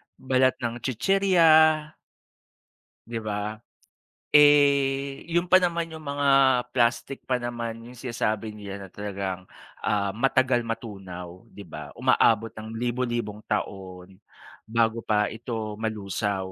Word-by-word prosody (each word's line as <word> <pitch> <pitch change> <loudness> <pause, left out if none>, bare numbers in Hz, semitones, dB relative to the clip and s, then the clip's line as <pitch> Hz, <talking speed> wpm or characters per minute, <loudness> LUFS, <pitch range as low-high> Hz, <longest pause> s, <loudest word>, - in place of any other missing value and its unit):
balat 130 0 +2
ng 120 0 -3
chichirya. 185 - +2 1.6
Di 115 0 -4
ba? 105 -1 -3 0.8
Eh, 140 -2 +4
yun 175 +1 +1
pa 185 +1 +5
naman 170 -1 0
yung 160 - -10
mga 140 0 -1 0.5
plastic 120 +2 0
pa 125 -1 -1
naman 120 -1 -4
yung 125 - -12
sinasabi 115 -3 -2
nila 100 -2 -8
na - - -21
talagang, 95 -3 -5 0.3
ah, 100 -1 0
matagal 130 +2 +2
matunaw, 95 -4 -7
di 100 -2 -12
ba? 85 - -9
Umaabot 115 0 +3
ng 110 +1 -9
libo-libong 120 -3 -2
taon, 95 -1 -5 0.5
bago 115 0 +1
pa 105 -2 +1
ito 110 -2 -5
malusaw. 100 -3 -3
115 Hz, 115 wpm, -25 LUFS, 105-130 Hz, 1.6 s, pa